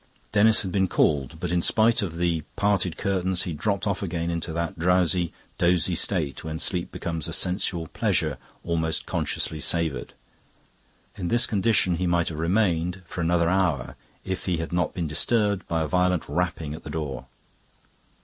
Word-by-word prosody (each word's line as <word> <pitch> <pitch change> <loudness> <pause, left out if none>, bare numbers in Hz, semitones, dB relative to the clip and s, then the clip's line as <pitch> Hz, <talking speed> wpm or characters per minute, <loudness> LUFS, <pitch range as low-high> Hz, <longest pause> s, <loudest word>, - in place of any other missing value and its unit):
Denis 110 +1 +4
had 95 - -4
been 95 0 +2
called, 70 -7 +1
but - - -2
in 90 0 +2
spite 110 +5 +4
of 85 -5 -3
the 85 -2 +1
parted 95 -5 +1
curtains 95 -2 0
he 90 - -4
had 75 - -6
dropped 100 +2 0
off 100 -2 -1
again 85 -3 -2
into 85 0 -3
that 85 0 -3
drowsy, 90 0 +2 0.3
dozy 90 0 +3
state 80 -6 -2
when 80 0 -4
sleep 90 +1 -2
becomes 80 -3 -4
a - - -5
sensual 90 -2 +1
pleasure - - 0 0.2
almost 80 -1 -1
consciously 80 - -2
savoured. 80 -2 -1 1.0
In 90 - -3
this 120 +5 +4
condition 100 -5 +2
he 90 +1 0
might 85 -1 +2
have 80 -2 -6
remained 90 0 +1
for 90 - -5
another 85 0 +2
hour 85 -8 +1 0.3
if 95 0 -3
he 90 -3 0
had 80 +2 -4
not 90 0 0
been 85 - -1
disturbed 100 +5 +1
by 80 -1 0
a - - -2
violent 90 0 +1
rapping 80 -1 -2
at 80 - -9
the - - -8
door. 70 -4 -4
85 Hz, 175 wpm, -25 LUFS, 80-95 Hz, 1.0 s, Denis